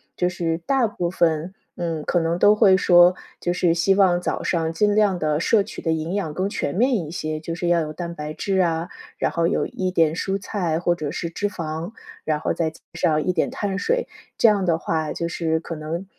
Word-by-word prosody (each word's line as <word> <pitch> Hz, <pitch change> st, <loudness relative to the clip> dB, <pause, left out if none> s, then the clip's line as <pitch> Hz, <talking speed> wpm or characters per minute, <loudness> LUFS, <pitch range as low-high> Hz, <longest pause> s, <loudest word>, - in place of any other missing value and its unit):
就 180 Hz, -, +1 dB
是 165 Hz, -2 st, -2 dB
大 265 Hz, +7 st, +1 dB
部 180 Hz, -5 st, -2 dB
分， 170 Hz, 0 st, 0 dB, 0.2 s
嗯， 165 Hz, -3 st, -3 dB
可 175 Hz, -, +1 dB
能 165 Hz, +1 st, 0 dB
都 205 Hz, +3 st, +6 dB
会 205 Hz, -3 st, +5 dB
说， 175 Hz, -1 st, +6 dB, 0.2 s
就 175 Hz, -, -1 dB
是 175 Hz, -2 st, +2 dB
希 175 Hz, +3 st, +2 dB
望 185 Hz, -3 st, +3 dB
早 -, -, -2 dB
上 165 Hz, -2 st, 0 dB
尽 205 Hz, +3 st, +2 dB
量 205 Hz, -3 st, +3 dB
地 155 Hz, -2 st, 0 dB
摄 205 Hz, +5 st, +3 dB
取 210 Hz, -, -9 dB
的 165 Hz, -, 0 dB
营 160 Hz, +2 st, -2 dB
养 195 Hz, -6 st, -2 dB
更 185 Hz, +3 st, 0 dB
全 160 Hz, -, -3 dB
面 250 Hz, +7 st, +3 dB
一 165 Hz, -6 st, -5 dB
些。 155 Hz, -2 st, -4 dB
就 165 Hz, +2 st, -5 dB
是 175 Hz, +1 st, -3 dB
要 175 Hz, -1 st, +4 dB
有 155 Hz, -1 st, -4 dB
蛋 170 Hz, +1 st, -5 dB
白 150 Hz, -2 st, -6 dB
质 195 Hz, +3 st, -1 dB
啊， 165 Hz, -2 st, 0 dB, 0.3 s
然 -, -, 0 dB
后 170 Hz, 0 st, +1 dB
有 -, -, 0 dB
一 185 Hz, -1 st, -3 dB
点 165 Hz, -4 st, +2 dB
蔬 195 Hz, +3 st, -2 dB
菜 185 Hz, -5 st, -2 dB
或 175 Hz, 0 st, +2 dB
者 155 Hz, -4 st, -4 dB
是 170 Hz, +2 st, -4 dB
脂 205 Hz, +4 st, -2 dB
肪， 165 Hz, +1 st, -5 dB, 0.3 s
然 155 Hz, -1 st, 0 dB
后 -, -, 0 dB
再 165 Hz, -2 st, 0 dB
加 155 Hz, -, -17 dB
上 165 Hz, -2 st, +1 dB
一 185 Hz, -, +2 dB
点 170 Hz, -, +1 dB
碳 195 Hz, -1 st, -3 dB
水， -, -, 0 dB, 0.3 s
这 -, -, +5 dB
样 205 Hz, -3 st, +3 dB
的 170 Hz, -3 st, +2 dB
话 160 Hz, -2 st, -2 dB
就 170 Hz, -, -3 dB
是 160 Hz, -1 st, -1 dB
可 165 Hz, -, -6 dB
能 160 Hz, +5 st, -5 dB
170 Hz, 250 characters per minute, -23 LUFS, 160-190 Hz, 0.3 s, 都